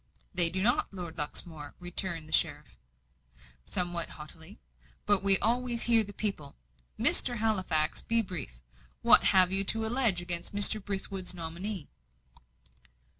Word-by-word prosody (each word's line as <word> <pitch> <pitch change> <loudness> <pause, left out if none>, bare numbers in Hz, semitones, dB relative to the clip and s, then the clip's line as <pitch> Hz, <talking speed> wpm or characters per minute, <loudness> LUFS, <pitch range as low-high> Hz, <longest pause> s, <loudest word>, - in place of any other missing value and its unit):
"They 175 -2 +8
do 185 +2 -4
not, 240 +3 -1
Lord 175 -4 -8
Luxmore," 150 0 -6
returned 175 -2 -4
the 155 - -11
sheriff, - - 0 0.9
somewhat 175 -2 -1
haughtily. 160 +6 -12 0.5
"But 205 -2 +1
we 195 -1 +6
always 240 +2 -2
hear 230 -2 +1
the 205 - -12
people. 195 -9 -6 0.4
Mr. 245 - +4
Halifax, 190 -8 +3
be 230 0 -2
brief. 155 - -6 0.4
What - - +5
have 185 -1 +4
you 195 0 +2
to 220 +3 0
allege 225 -5 -1
against 175 +2 -1
Mr. 205 +1 +3
Brithwood's 190 -2 -7
nominee?" 170 +1 -7
190 Hz, 130 wpm, -27 LUFS, 170-215 Hz, 0.9 s, They